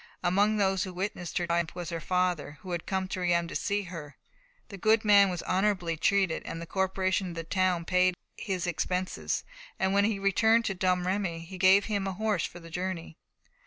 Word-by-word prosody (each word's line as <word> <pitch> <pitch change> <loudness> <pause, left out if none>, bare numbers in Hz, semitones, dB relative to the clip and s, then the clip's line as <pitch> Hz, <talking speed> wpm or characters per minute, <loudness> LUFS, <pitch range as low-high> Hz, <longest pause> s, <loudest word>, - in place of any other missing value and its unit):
Among 200 +4 +3
those 190 -2 +2
who 185 -2 -6
witnessed 180 -2 -4
her 175 - 0
triumph 170 -1 -1
was 175 -1 -5
her 165 - -3
father, 175 -4 -1
who 185 - -8
had 170 -1 -4
come 190 -1 -1
to 190 - -3
Reims 170 -1 +1
to - - -7
see 205 0 0
her. 165 -5 -9 0.5
The 200 - -8
good 215 +3 +3
man 200 -2 +6
was 180 -2 -4
honourably 185 -3 0
treated; 190 0 +1
the 165 0 -6
corporation 190 +1 0
of 170 - -7
the 165 - -4
town 180 -1 0
paid 180 0 +3 0.2
his 190 -4 -3
expenses, 180 +2 -2 0.3
and 190 0 +1
when 200 0 +4
he 215 -1 0
returned 220 +4 +3
to 195 - 0
Domremy, 180 -1 -1
gave 195 +2 +6
him 200 -3 -1
a 190 - -2
horse 210 -3 0
for 175 - -12
the 165 -1 -13
journey. 180 -2 -4
185 Hz, 195 wpm, -29 LUFS, 175-195 Hz, 0.5 s, man